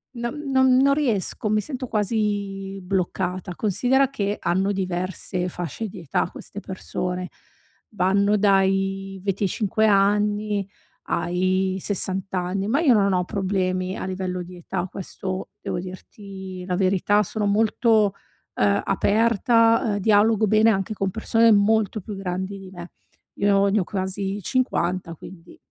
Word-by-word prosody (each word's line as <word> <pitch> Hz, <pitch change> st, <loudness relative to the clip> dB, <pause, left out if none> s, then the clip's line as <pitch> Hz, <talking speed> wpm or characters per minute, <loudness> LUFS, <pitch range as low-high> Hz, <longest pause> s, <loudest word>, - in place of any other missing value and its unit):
non 235 Hz, +4 st, -4 dB, 0.2 s
non 260 Hz, -1 st, +4 dB
non 275 Hz, +1 st, +4 dB
riesco, 225 Hz, -, 0 dB
mi 215 Hz, 0 st, +2 dB
sento 255 Hz, +1 st, -5 dB
quasi 200 Hz, -2 st, -2 dB
bloccata. 180 Hz, 0 st, -2 dB
Considera 250 Hz, +7 st, +2 dB
che 205 Hz, -6 st, -2 dB
hanno 190 Hz, +3 st, 0 dB
diverse 185 Hz, -1 st, -3 dB
fasce 180 Hz, +6 st, -5 dB
di 185 Hz, -, -10 dB
età 165 Hz, +2 st, -1 dB
queste 205 Hz, -, -9 dB
persone. 180 Hz, -1 st, -4 dB, 0.7 s
Vanno 200 Hz, +2 st, +2 dB
dai 195 Hz, -1 st, +1 dB
25 200 Hz, +2 st, 0 dB
anni 205 Hz, 0 st, +2 dB, 0.4 s
ai 185 Hz, +2 st, 0 dB
60 190 Hz, -1 st, 0 dB
anni, 185 Hz, +2 st, -1 dB
ma 275 Hz, +7 st, +2 dB
io 270 Hz, -7 st, +5 dB
non 200 Hz, -2 st, +3 dB
ho 180 Hz, 0 st, +2 dB
problemi 185 Hz, -2 st, -1 dB
a -, -, -4 dB
livello 185 Hz, -1 st, -3 dB
di 180 Hz, +1 st, -11 dB
età, 175 Hz, +1 st, -4 dB
questo 185 Hz, 0 st, -5 dB
devo -, -, -3 dB
dirti 185 Hz, 0 st, -9 dB
la 180 Hz, -1 st, -1 dB
verità, 195 Hz, +2 st, +2 dB
sono 210 Hz, +2 st, -3 dB
molto, 215 Hz, 0 st, +3 dB, 0.4 s
ehm, 200 Hz, 0 st, +2 dB
aperta, 230 Hz, +1 st, +3 dB
ehm, -, -, -2 dB
dialogo 215 Hz, +1 st, +3 dB
bene 215 Hz, +2 st, +4 dB
anche 195 Hz, +1 st, -1 dB
con 195 Hz, -1 st, -1 dB
persone 225 Hz, +1 st, +3 dB
molto 215 Hz, 0 st, +2 dB
più 205 Hz, +2 st, -7 dB
grandi 190 Hz, +1 st, -4 dB
di 190 Hz, -1 st, -11 dB
me. 175 Hz, -1 st, -10 dB, 0.4 s
Io 200 Hz, 0 st, +3 dB
ne 210 Hz, +1 st, +2 dB
ho -, -, +1 dB
quasi 195 Hz, +1 st, -3 dB
50, 185 Hz, -8 st, -1 dB
quindi 170 Hz, +1 st, -13 dB
195 Hz, 140 wpm, -23 LUFS, 185-215 Hz, 0.7 s, io